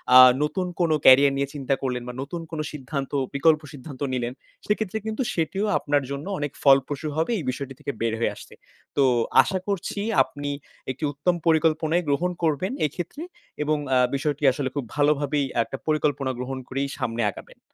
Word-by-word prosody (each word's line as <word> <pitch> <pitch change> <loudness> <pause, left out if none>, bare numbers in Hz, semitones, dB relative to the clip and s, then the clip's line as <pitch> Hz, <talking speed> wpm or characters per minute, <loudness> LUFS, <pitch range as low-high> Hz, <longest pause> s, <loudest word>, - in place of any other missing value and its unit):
আ - - +12 0.3
নতুন 180 +5 -1
কোনো 165 -3 +3
career 140 +2 +8
নিয়ে 140 - 0
চিন্তা 135 -2 -1
করলেন 125 -2 -2
বা 125 - -5
নতুন 155 +5 -5
কোনো 155 -2 -3
সিদ্ধান্ত 140 -1 -5 0.2
বিকল্প 155 +2 +4
সিদ্ধান্ত 140 -1 -10
নিলেন। 120 -1 -2 0.3
সেক্ষেত্রে 210 -1 -1
কিন্তু 220 +3 -2
সেটিও 185 +5 -1
আপনার 145 -1 +1
জন্য 140 +2 -4
অনেক 145 -1 -2
ফলপ্রসূ 140 +2 +3
হবে 160 +9 +1
এই - - -5
বিষয়টি 135 +1 -4
থেকে - - -3
বের 115 -1 +1
হয়ে 115 - 0
আসতে। - - -13 0.4
তো 140 - +5 0.4
আশা 190 - -2
করছি 200 0 -2 0.2
আপনি 145 0 -6 0.4
একটি 130 +5 -9
উত্তম 145 +5 0
পরিকল্পনাই 160 +1 +3
গ্রহণ 170 +6 +1
করবেন 160 +4 +1
এইক্ষেত্রে। 175 - -5 0.4
এবং 155 +1 +1 0.2
আ - - +5 0.2
বিষয়টি 145 +1 -2
আসলে 130 0 -2
খুব 140 -3 -2
ভালোভাবেই 145 -1 +2 0.2
একটা 115 +4 -7
পরিকল্পনা 145 -3 +1
গ্রহণ 130 +1 -4
করেই 135 +2 -1
সামনে 115 0 -2
আগাবেন। - - -13
145 Hz, 170 wpm, -25 LUFS, 135-160 Hz, 0.4 s, আ